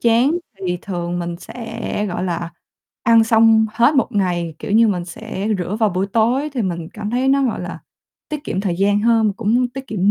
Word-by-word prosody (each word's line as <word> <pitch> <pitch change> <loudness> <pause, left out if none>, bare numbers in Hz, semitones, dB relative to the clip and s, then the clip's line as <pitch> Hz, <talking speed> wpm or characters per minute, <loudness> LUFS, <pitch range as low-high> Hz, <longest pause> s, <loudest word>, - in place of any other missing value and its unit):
chén 235 +4 +4 0.4
thì 180 0 -1
thường 175 -2 -3
mình 170 0 -4
sẽ, 225 -2 -5
gọi 180 +1 -3
là, 170 -1 -3 0.5
ăn 230 -1 +5
xong 225 -1 +5
hết 240 +6 +3
1 265 - +3
ngày, 175 -5 -1
kiểu - - -6
như, 225 0 +5
mình 180 -3 -1
sẽ 210 +2 -5
rửa 185 +4 -2
vào 215 - +4
buổi 185 +1 -1
tối 240 +8 +1
thì 250 -5 -1
mình 170 -3 -3
cảm 210 0 -4
thấy 255 +2 +1
nó, 275 0 +3
gọi 240 - -1
là, - - -6 0.5
tiết 300 -1 -5
kiệm 190 - -2
thời 180 -4 -1
gian 205 +2 +2
hơn, 225 0 +3
mà - - 0
cũng 235 +3 +1
tiết 270 +2 -8
kiệm 200 -1 +1
215 Hz, 215 wpm, -19 LUFS, 180-235 Hz, 0.5 s, ăn